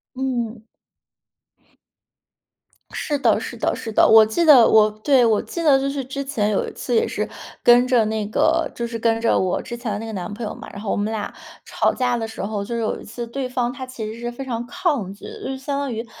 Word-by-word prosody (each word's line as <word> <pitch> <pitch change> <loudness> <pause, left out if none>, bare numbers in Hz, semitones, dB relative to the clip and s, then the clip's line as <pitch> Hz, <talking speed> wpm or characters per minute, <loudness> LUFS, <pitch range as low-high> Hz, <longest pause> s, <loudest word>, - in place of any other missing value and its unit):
嗯。 240 -4 -3 2.3
是 295 -2 -2
的， 280 - +3
是 - - -7
的， - - 0
是 225 - -6
的。 - - +5
我 220 0 +8
记 275 +11 0
得 265 -7 +8
我 215 -1 +6
对， 270 -4 +5
我 220 -2 +3
记 340 - -5
得 285 -4 +5
就 275 +1 -1
是 275 -1 -3
之 275 +1 -4
前 220 -7 -1
有 200 - 0
一 - - -6
次 - - -4
也 455 +1 +3
是 - - -3 0.4
跟 245 +1 +6
着 240 -4 +3
那 215 -1 -2
个， 325 +9 +1
就 235 - -3
是 230 -1 -5
跟 225 0 +1
着 230 - +3
我 185 -1 0
之 240 - -7
前 230 -2 -4
的 - - -2
那 225 - -6
个 225 - -6
男 185 -1 -5
朋 225 +1 -5
友 - - -4
嘛。 - - -10
然 200 - -9
后 215 - -3
我 - - +1
们 210 +2 -1
俩 215 -2 -4 0.3
吵 - - +1
架 245 -2 0
的 225 -1 -3
时 220 - -7
候， 205 0 -3
就 235 +4 -4
是 230 - -1
有 220 - -2
一 - - -11
次 235 +2 -6
对 255 +2 -4
方， 245 -1 -1
他 260 - -6
其 255 -4 -7
实 230 - -9
是 240 0 -4
非 265 +3 -7
常 235 -2 -3
抗 250 - -1
拒， 200 - -13 0.2
就 265 0 -4
相 280 +1 -3
当 280 -2 -2
于 230 +1 -4
235 Hz, 265 characters per minute, -22 LUFS, 220-265 Hz, 2.3 s, 我